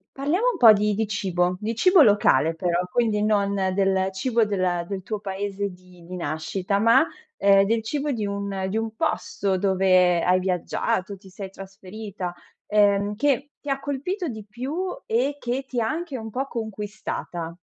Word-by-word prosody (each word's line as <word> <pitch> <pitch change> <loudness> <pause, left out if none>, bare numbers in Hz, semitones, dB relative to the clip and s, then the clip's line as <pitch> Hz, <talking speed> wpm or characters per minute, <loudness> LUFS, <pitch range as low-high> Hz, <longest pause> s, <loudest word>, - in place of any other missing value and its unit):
Parliamo 315 - 0
un - - -6
po' 225 -3 +9
di 210 0 +1
di 220 +2 0
cibo, 185 -3 -1
di 220 +2 -3
cibo 365 - +5
locale 165 - +4
però, 175 +1 0
quindi 220 -3 +1
non 205 -2 +2 0.2
del 190 -1 +2
cibo 230 +4 +1
del 185 -4 -1
del 195 -1 -5
tuo 215 +2 -4
paese 200 0 -3
di 180 -1 -17
di 185 - -7
nascita, 180 +5 -2
ma, 230 +7 +5 0.3
uhm, 195 0 +5
del 225 +2 0
cibo 290 +5 -2
di 220 -5 -2
un 200 -1 -3
di 215 - -1
un 225 0 -3
posto 310 - -1
dove 185 -2 +3
hai 180 +1 +3
viaggiato, 185 +1 -1
ti 190 - -16
sei 190 0 -8
trasferita, 195 -1 -7 0.3
ehm, 205 -1 +2
che 280 +3 0
ti 290 - -7
ha 275 - 0
colpito 305 +7 -3
di 220 -5 -6
più, 255 +7 -5 0.3
e 255 +6 0
che 255 +2 -3
ti 250 - -2
ha 220 - 0
anche 315 0 -3
un 220 -2 -7
po' 270 +4 -2
conquistata? 210 -6 -5
205 Hz, 175 wpm, -24 LUFS, 190-235 Hz, 0.3 s, po